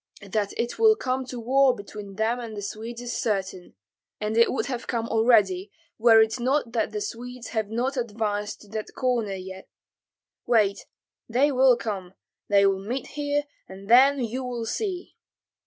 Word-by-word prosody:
That 205 0 -1
it 235 +1 -2
will 440 -1 +6
come 260 -7 -2
to 250 -2 -6
war 260 +2 +3
between 200 -1 -9
them 225 +3 0
and 225 -3 -7
the 205 - -5
Swedes 230 +4 -6
is 240 -1 -4
certain, 190 - -3 0.4
and 215 +1 -2
it 230 0 +5
would - - -1
have 250 -3 -5
come 230 -2 -2
already 210 -5 +3 0.3
were 225 0 +7
it 220 +3 -3
not 255 0 0
that 230 - 0
the 420 - -4
Swedes 250 - -6
have 220 -3 -2
not 250 +5 -1
advanced 210 -3 -2
to 210 - -15
that 215 0 -6
corner 240 -6 0
as 190 -1 -6
yet. 190 0 -10 0.8
Wait, 205 -4 +2 0.4
they 265 +6 +3
will 260 -2 +5
come, 195 -5 -5 0.3
they 200 -1 +4
will 195 -1 +1
meet 250 +6 -4
here, 290 0 -1 0.3
and 195 +1 -11
then 270 +3 +7
you 245 +3 -3
will 240 -2 -4
see!" 375 - -4
230 Hz, 175 wpm, -25 LUFS, 205-255 Hz, 0.8 s, were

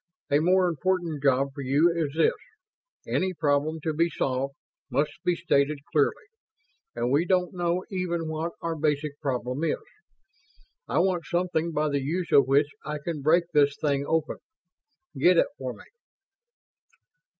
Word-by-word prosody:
A 145 - +5
more 180 +3 +3
important 175 -2 -1
job 135 0 +2
for 140 - -7
you 145 +6 +3
is 155 -3 -2
this: 165 - +4 0.7
Any 185 -1 -1
problem, 150 +1 0
to 160 +1 -1
be 165 +3 +2
solved, 135 -2 -2 0.3
must 150 +1 +1
be 180 - +2
stated 145 -2 +1
clearly; 150 - +1 0.7
and 120 +1 -1
we 145 +4 +3
don't 180 0 +1
know 175 0 -1
even 170 -3 -2
what 160 +2 -3
our 165 -1 -1
basic 150 -1 -1
problem 130 0 -2
is. 165 - +1 1.1
I - - -1
want 180 -2 +1
something 175 -2 0
by 155 0 0
the 140 -1 0
use 170 +6 -2
of 140 -2 +6
which 140 +2 +3
I 150 0 -4
can 150 0 -5
break 165 +5 +4
this 145 -1 +3
thing 140 -2 0
open. 160 -2 0 0.8
Get 175 +5 +5
it - - +5
for 130 -1 -3
me." - - -13
155 Hz, 155 wpm, -26 LUFS, 140-170 Hz, 1.1 s, of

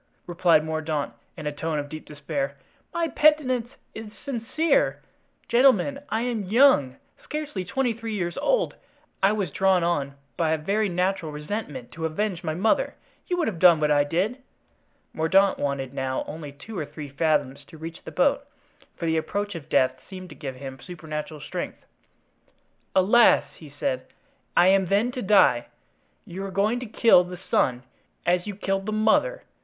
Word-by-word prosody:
replied 170 -3 +3
Mordaunt, 155 -2 -2 0.2
in 155 - -7
a 150 - -1
tone 155 +1 -3
of 145 -1 -3
deep 155 +1 -8
despair, 145 -1 -4 0.4
"my 335 -1 0
penitence 265 -7 +2 0.2
is 220 -1 -8 0.2
sincere. 280 +4 +1 0.5
Gentlemen, 260 +1 +4
I 220 - 0
am 235 -5 -2
young, 210 - +4 0.3
scarcely 300 -11 -4
twenty 255 +4 0
three 225 -1 -5
years 175 -3 -2
old. - - +1 0.5
I 195 - +5
was 200 -7 -2
drawn 190 +1 +3
on 140 -5 -1 0.2
by 160 -2 +2
a - - +1
very 200 +7 0
natural 180 -2 -1
resentment 150 - -5
to 160 +3 -5
avenge 180 +2 -2
my 155 -2 -2
mother. 220 - +1 0.3
You 355 - -1
would 335 - +1
have 185 -7 -3
done 175 -3 +7
what 150 -1 +2
I 145 -1 +4
did." 190 - -1 0.7
Mordaunt 190 +5 +3
wanted 140 -2 -2
now 130 0 -2
only 150 -2 -7
two 180 +10 -11
or 155 - -2
three 150 -2 -8
fathoms 145 -2 0
to 165 - -14
reach 165 +1 -8
the - - -7
boat, - - +1 0.5
for - - -4
the 160 0 +1
approach 205 +5 -2
of 155 -3 -9
death 130 -2 +2
seemed 185 -2 -9
to 150 - -11
give 135 -4 -6
him 135 0 -8
supernatural 155 -2 -7
strength. - - -6 1.1
"Alas!" 215 +6 +6
he 155 - -13
said, 130 -2 -3 0.5
"I 180 - +7
am 190 -1 +3
then 205 +7 +2
to 250 - -5
die? 190 - +4 0.6
You 185 +3 -6
are 195 - -4
going 210 +5 +1
to 250 - -6
kill 215 -4 +5
the 180 0 -8
son, 130 -8 0 0.4
as 180 +2 +1
you 205 - -4
killed 195 0 -2
the - - -1
mother! 220 - +2
180 Hz, 170 wpm, -25 LUFS, 150-215 Hz, 1.1 s, done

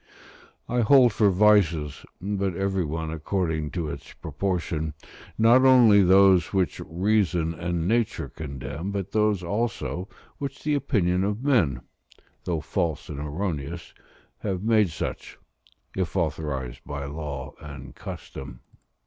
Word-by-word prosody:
I 125 - 0
hold 125 0 +6
for 105 0 +4
vices 90 -7 +3
(but 100 -1 -2
every 95 -1 0
one 80 0 -3
according 80 -1 -2
to 85 -4 -2
its 70 0 -9
proportion), 80 -2 -3 0.4
not 115 +4 +6
only 120 -6 +7
those 95 -2 +5
which 95 -3 0
reason 90 -2 +1
and 85 0 -2
nature 110 -8 0
condemn, 70 +4 -6
but 100 -2 -4
those 105 -3 +1
also 100 -1 -2 0.3
which 140 -1 -5
the 150 - +1
opinion 95 -10 +1
of 105 +4 -2
men, 85 - +2 0.6
though 85 -3 -1
false 80 +1 -2
and 70 - -5
erroneous, 80 0 -4 0.5
have 95 -2 -3
made 110 -3 +3
such, 80 - -5 0.6
if 95 -1 -2
authorised 75 -7 -2
by 70 -1 -5
law 70 -1 -6
and 70 -4 -9
custom. 65 -3 -9
90 Hz, 125 wpm, -25 LUFS, 75-105 Hz, 0.6 s, only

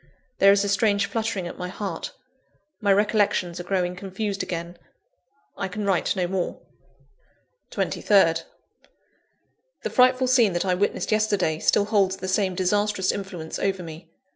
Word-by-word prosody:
There 195 - +7
is 200 0 +3
a - - -1
strange 200 0 +2
fluttering 215 -2 -2
at - - -9
my 180 - -3
heart; 200 - -5 0.7
my 205 -2 +3
recollections 205 -3 +1
are - - -5
growing 180 -1 -1
confused 195 +2 -4
again 170 0 -5 0.8
I 195 - -3
can 205 +2 -5
write 195 -1 +1
no 185 -2 0
more. 180 0 -3 1.1
23rd. 165 -5 +2 1.4
The - - -2
frightful 255 0 +4
scene 245 -6 +4
that 175 +2 -1
I 185 - +2
witnessed 200 +4 -1
yesterday 205 -7 +1
still 200 - +2
holds 200 -3 +1
the 185 - -6
same 190 -1 0
disastrous 195 +1 +1
influence 190 -5 -6
over 190 -2 -1
me. 165 0 -10
195 Hz, 145 wpm, -24 LUFS, 180-205 Hz, 1.4 s, There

